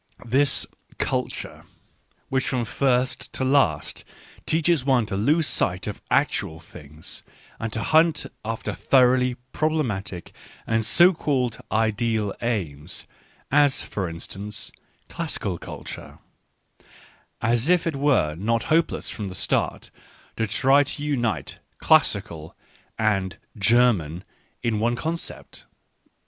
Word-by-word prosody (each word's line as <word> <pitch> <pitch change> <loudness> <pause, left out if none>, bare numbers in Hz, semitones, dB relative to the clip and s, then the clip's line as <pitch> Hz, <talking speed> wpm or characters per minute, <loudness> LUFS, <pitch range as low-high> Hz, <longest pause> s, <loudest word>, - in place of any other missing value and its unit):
This 140 +4 +2 0.3
"culture," - - -3 0.7
which 130 -1 0
from 125 -3 0
first 125 +1 0
to - - -2
last 130 - +2 0.4
teaches 160 -2 +2
one 130 -4 +3
to 105 -2 -4
lose 150 +11 +2
sight 90 -8 -1
of 105 - -5
actual 80 - +1
things 75 -1 -11 0.4
and 115 -1 -3
to 110 0 -2
hunt 160 +4 +3 0.2
after 110 -1 -3
thoroughly 125 +5 +3 0.2
problematic 120 - -2 0.3
and 115 0 +1
so 175 - +6
called 130 -7 -1
ideal 110 -1 +1
aims, 85 -10 -3 0.5
as, 145 -1 +4
for 95 -4 -3
instance, 95 +5 -7 0.2
" - - -39
classical - - -3
culture - - -8 0.5
" - - -26
— - - -32
as 120 +6 +1
if 180 -2 +4
it 165 -3 -1
were 135 - +2
not 115 +8 0
hopeless 165 +1 +1
from 105 - -5
the 90 - -6
start - - -1 0.4
to 110 - 0
try 135 +6 +4
to 145 +1 -6
unite 120 - -1
* - - -46
" - - -44
classical 80 -1 +2 0.2
" - - -32
and 95 -5 0
" - - -46 0.2
German 95 -9 +3 0.2
" - - -39
in 110 -3 +1
one 120 +2 +1
concept. 165 +6 -5
115 Hz, 130 wpm, -24 LUFS, 100-140 Hz, 0.7 s, so